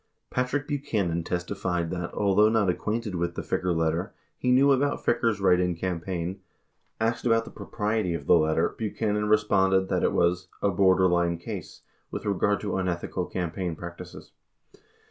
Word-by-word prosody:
Patrick 130 Hz, +3 st, -1 dB
Buchanan 105 Hz, -, -1 dB
testified 90 Hz, -1 st, -2 dB
that, 90 Hz, -1 st, -4 dB
although 105 Hz, +1 st, +4 dB
not 105 Hz, -4 st, +2 dB
acquainted 110 Hz, +3 st, -3 dB
with 85 Hz, -1 st, -2 dB
the -, -, -4 dB
Ficker 90 Hz, 0 st, -1 dB
letter, 80 Hz, +5 st, -1 dB, 0.2 s
he 125 Hz, -, 0 dB
knew 135 Hz, +3 st, +5 dB
about 140 Hz, +2 st, +1 dB
Ficker's 115 Hz, -3 st, +1 dB
write 90 Hz, -2 st, +4 dB
in 90 Hz, -1 st, 0 dB
campaign. 90 Hz, +1 st, -3 dB, 0.6 s
65 110 Hz, -, +2 dB
Asked 115 Hz, -, -13 dB
about 115 Hz, 0 st, +3 dB
the -, -, -10 dB
propriety 105 Hz, -5 st, -2 dB
of -, -, -6 dB
the -, -, +5 dB
letter, 80 Hz, 0 st, +3 dB
Buchanan 105 Hz, -1 st, -1 dB
responded 95 Hz, -3 st, +3 dB
that -, -, +1 dB
it -, -, +2 dB
was 90 Hz, +1 st, +1 dB
"a 100 Hz, -, +1 dB
borderline 90 Hz, -2 st, +3 dB
case," 85 Hz, -3 st, -8 dB, 0.3 s
with -, -, -6 dB
regard 100 Hz, 0 st, +1 dB
to 100 Hz, -2 st, -2 dB
unethical 90 Hz, -1 st, -2 dB
campaign 90 Hz, -1 st, -3 dB
practices. 85 Hz, +1 st, -9 dB
95 Hz, 160 wpm, -26 LUFS, 85-105 Hz, 0.6 s, knew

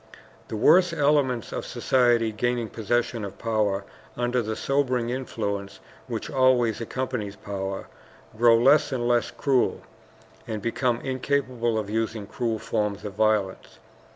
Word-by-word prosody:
The -, -, -5 dB
worse 180 Hz, -, +5 dB
elements 140 Hz, -6 st, +1 dB
of -, -, -4 dB
society, 120 Hz, -3 st, +2 dB
gaining 120 Hz, +1 st, -1 dB
possession 115 Hz, +1 st, -1 dB
of 100 Hz, -1 st, -7 dB
power, 105 Hz, -3 st, 0 dB, 0.3 s
under 120 Hz, 0 st, +1 dB
the 110 Hz, -1 st, -3 dB
sobering 130 Hz, -3 st, 0 dB
influence 100 Hz, -6 st, -4 dB, 0.3 s
which 115 Hz, -3 st, -4 dB
always 130 Hz, -4 st, +2 dB
accompanies 115 Hz, -4 st, -3 dB
power, 95 Hz, -1 st, -5 dB, 0.5 s
grow 115 Hz, +1 st, +5 dB
less 140 Hz, +6 st, +4 dB
and 120 Hz, -2 st, -1 dB
less 120 Hz, -1 st, +2 dB
cruel, 135 Hz, -3 st, +1 dB, 0.7 s
and 110 Hz, -1 st, -3 dB
become 115 Hz, +2 st, -1 dB
incapable 130 Hz, -3 st, -1 dB
of 105 Hz, -2 st, -2 dB
using 110 Hz, 0 st, -2 dB
cruel 115 Hz, +2 st, -2 dB
forms 105 Hz, -1 st, -2 dB
of 100 Hz, -, -5 dB
violence. 105 Hz, -2 st, 0 dB
115 Hz, 130 wpm, -25 LUFS, 105-130 Hz, 0.7 s, worse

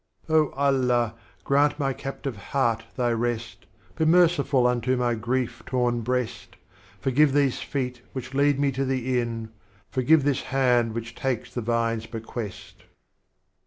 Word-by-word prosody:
Oh 155 Hz, -2 st, +3 dB
Allah, 125 Hz, -5 st, +2 dB, 0.3 s
grant 145 Hz, +1 st, +3 dB
my 135 Hz, -3 st, 0 dB
Captive 135 Hz, -1 st, -5 dB
Heart 115 Hz, +1 st, -1 dB
Thy 120 Hz, -1 st, +1 dB
Rest, 115 Hz, -3 st, -3 dB, 0.3 s
Be 160 Hz, -, 0 dB
merciful 160 Hz, -6 st, +4 dB
unto 125 Hz, +1 st, +1 dB
my 120 Hz, -1 st, +1 dB
grief 120 Hz, +1 st, -2 dB
torn 120 Hz, -2 st, 0 dB
Breast, 125 Hz, 0 st, -3 dB, 0.4 s
Forgive 135 Hz, +2 st, +3 dB
these 140 Hz, -3 st, +2 dB
Feet 125 Hz, -3 st, -3 dB
which 130 Hz, 0 st, -6 dB
lead 140 Hz, 0 st, +3 dB
me 140 Hz, -1 st, +2 dB
to 135 Hz, +1 st, -1 dB
the 130 Hz, -1 st, 0 dB
Inn, 115 Hz, -2 st, -4 dB, 0.4 s
Forgive 140 Hz, +4 st, +4 dB
this 140 Hz, -2 st, +1 dB
Hand 125 Hz, -4 st, +2 dB
which 115 Hz, 0 st, -5 dB
takes 130 Hz, -1 st, -3 dB
the 120 Hz, -, -2 dB
Vine's 115 Hz, -1 st, 0 dB
Bequest.' 115 Hz, -2 st, -7 dB
125 Hz, 140 wpm, -25 LUFS, 115-135 Hz, 0.4 s, merciful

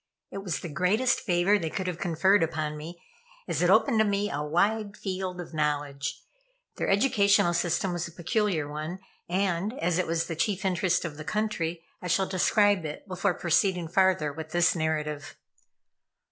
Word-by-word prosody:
It 195 Hz, -, -5 dB
was 190 Hz, -4 st, -3 dB
the -, -, -5 dB
greatest 200 Hz, -, +1 dB
favor 195 Hz, -2 st, +2 dB
they 160 Hz, -, -2 dB
could 190 Hz, +3 st, -4 dB
have 180 Hz, -2 st, -3 dB
conferred 190 Hz, +3 st, +3 dB
upon 155 Hz, -2 st, -1 dB
me, 165 Hz, +3 st, -8 dB, 0.5 s
as -, -, -1 dB
it -, -, +3 dB
opened 235 Hz, -6 st, +4 dB
to -, -, +6 dB
me 205 Hz, 0 st, 0 dB
a 145 Hz, -, -2 dB
wide 200 Hz, +7 st, 0 dB
field 185 Hz, -2 st, -4 dB
of 170 Hz, -2 st, -8 dB
knowledge. 145 Hz, -2 st, -2 dB, 0.5 s
Their -, -, -1 dB
educational 200 Hz, -5 st, +3 dB
system 175 Hz, +2 st, 0 dB
was 175 Hz, -1 st, -3 dB
a -, -, -11 dB
peculiar 175 Hz, -2 st, -1 dB
one, 155 Hz, +4 st, -5 dB, 0.3 s
and, 190 Hz, +4 st, 0 dB
as 175 Hz, +1 st, 0 dB
it 185 Hz, -, 0 dB
was 165 Hz, 0 st, 0 dB
the 165 Hz, -, -4 dB
chief 195 Hz, +3 st, -1 dB
interest 180 Hz, -1 st, +1 dB
of 150 Hz, -3 st, -6 dB
the 155 Hz, -, -6 dB
country. 175 Hz, -4 st, -2 dB, 0.2 s
I 180 Hz, -, -5 dB
shall 190 Hz, +2 st, +2 dB
describe 200 Hz, +1 st, +2 dB
it 150 Hz, +5 st, -7 dB
before 185 Hz, 0 st, 0 dB
proceeding 175 Hz, 0 st, +1 dB
farther 180 Hz, -4 st, +2 dB
with 155 Hz, +1 st, -7 dB
this 175 Hz, +2 st, +3 dB
narrative. 150 Hz, -2 st, -2 dB
175 Hz, 175 wpm, -27 LUFS, 160-195 Hz, 0.5 s, to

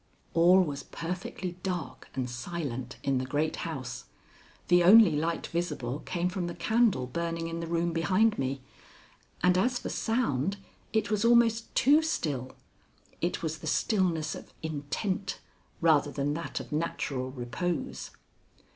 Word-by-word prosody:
All 175 Hz, +3 st, +6 dB
was 145 Hz, -4 st, -4 dB
perfectly 180 Hz, +1 st, -5 dB
dark 175 Hz, -8 st, -4 dB
and 130 Hz, -2 st, -1 dB
silent 130 Hz, -1 st, -5 dB
in 135 Hz, -2 st, +1 dB
the -, -, -2 dB
great 150 Hz, +4 st, -1 dB
house. 145 Hz, -7 st, -5 dB, 0.6 s
The 175 Hz, 0 st, +5 dB
only 210 Hz, +1 st, +8 dB
light 165 Hz, +3 st, -1 dB
visible 150 Hz, -6 st, -2 dB
came 175 Hz, +1 st, -2 dB
from 180 Hz, -1 st, -2 dB
the 175 Hz, -, -5 dB
candle 220 Hz, -, +2 dB
burning 165 Hz, +4 st, -3 dB
in 165 Hz, 0 st, -4 dB
the 165 Hz, -, -4 dB
room 170 Hz, 0 st, 0 dB
behind 190 Hz, +6 st, +2 dB
me, 135 Hz, 0 st, -2 dB, 0.8 s
and 180 Hz, 0 st, +5 dB
as 245 Hz, +5 st, +2 dB
for -, -, -5 dB
sound, 200 Hz, -, 0 dB, 0.3 s
it 220 Hz, -1 st, 0 dB
was 210 Hz, 0 st, +1 dB
almost 230 Hz, -1 st, +3 dB
too 290 Hz, +4 st, +6 dB
still 145 Hz, -, -2 dB, 0.7 s
it 175 Hz, 0 st, -1 dB
was 160 Hz, -1 st, -2 dB
the -, -, -7 dB
stillness 170 Hz, -7 st, +1 dB
of -, -, -10 dB
intent 170 Hz, +6 st, -3 dB, 0.4 s
rather 155 Hz, -3 st, +4 dB
than 145 Hz, 0 st, -1 dB
that 165 Hz, +2 st, -4 dB
of -, -, -9 dB
natural 145 Hz, -4 st, -2 dB
repose. 130 Hz, +7 st, -3 dB
170 Hz, 145 wpm, -29 LUFS, 145-185 Hz, 0.8 s, only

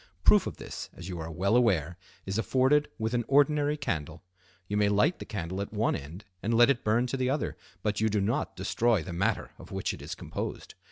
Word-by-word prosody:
Proof -, -, +6 dB
of -, -, -6 dB
this, -, -, -7 dB
as 90 Hz, +2 st, -8 dB
you 90 Hz, -2 st, -5 dB
are 80 Hz, 0 st, -5 dB
well 95 Hz, +6 st, +1 dB
aware, 90 Hz, -9 st, +3 dB, 0.3 s
is 95 Hz, +3 st, -1 dB
afforded 135 Hz, +5 st, +3 dB
with 110 Hz, +1 st, -2 dB
an 120 Hz, -1 st, +1 dB
ordinary 145 Hz, +1 st, +3 dB
candle. 80 Hz, -, -3 dB, 0.4 s
You 105 Hz, -, -2 dB
may 105 Hz, 0 st, +3 dB
light 105 Hz, -, +2 dB
the -, -, -6 dB
candle 95 Hz, -1 st, -4 dB
at 100 Hz, -, -5 dB
one 110 Hz, +1 st, +1 dB
end 80 Hz, +9 st, -8 dB, 0.2 s
and 115 Hz, +2 st, 0 dB
let 120 Hz, +3 st, +7 dB
it 125 Hz, -, -2 dB
burn 110 Hz, +3 st, +2 dB
to 125 Hz, +2 st, -2 dB
the 130 Hz, -1 st, 0 dB
other, 140 Hz, +2 st, -1 dB, 0.3 s
but 105 Hz, 0 st, 0 dB
you 110 Hz, -, +3 dB
do 105 Hz, 0 st, +1 dB
not 115 Hz, +10 st, -1 dB
destroy 105 Hz, +1 st, +1 dB
the 90 Hz, 0 st, -6 dB
matter 90 Hz, +3 st, 0 dB
of -, -, -12 dB
which -, -, -2 dB
it -, -, -9 dB
is -, -, -5 dB
composed. -, -, -5 dB
105 Hz, 225 wpm, -29 LUFS, 95-125 Hz, 0.4 s, let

